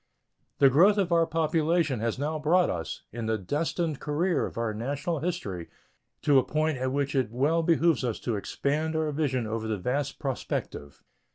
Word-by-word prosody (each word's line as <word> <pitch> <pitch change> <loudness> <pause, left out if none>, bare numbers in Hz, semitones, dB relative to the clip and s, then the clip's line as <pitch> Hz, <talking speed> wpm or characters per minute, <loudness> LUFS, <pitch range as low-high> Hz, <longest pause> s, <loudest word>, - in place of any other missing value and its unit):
The 135 -2 +6
growth 190 +10 +5
of 190 -3 +1
our 165 -1 +4
population 160 -3 +1
has 115 +2 -1
now 155 +3 -2
brought 170 +4 +3
us, 80 -2 -5
in 115 0 -4
the 110 0 +1
destined 150 - -2
career 165 +4 0
of - - -11
our 115 -2 -1
national 140 +8 -2
history, 100 - -4 0.5
to 140 -2 +5
a - - +1
point 155 -1 0
at 130 0 -1
which 140 0 -1
it 130 -5 +1
well 145 +8 +1
behooves 165 -3 +2
us 120 -3 -2
to 120 - -1
expand 150 +9 -1
our 160 -1 0
vision 140 -5 -1
over 110 0 -3
the 110 -1 -1
vast 135 +8 -2
prospective. 120 - -4
145 Hz, 180 wpm, -27 LUFS, 120-160 Hz, 0.5 s, The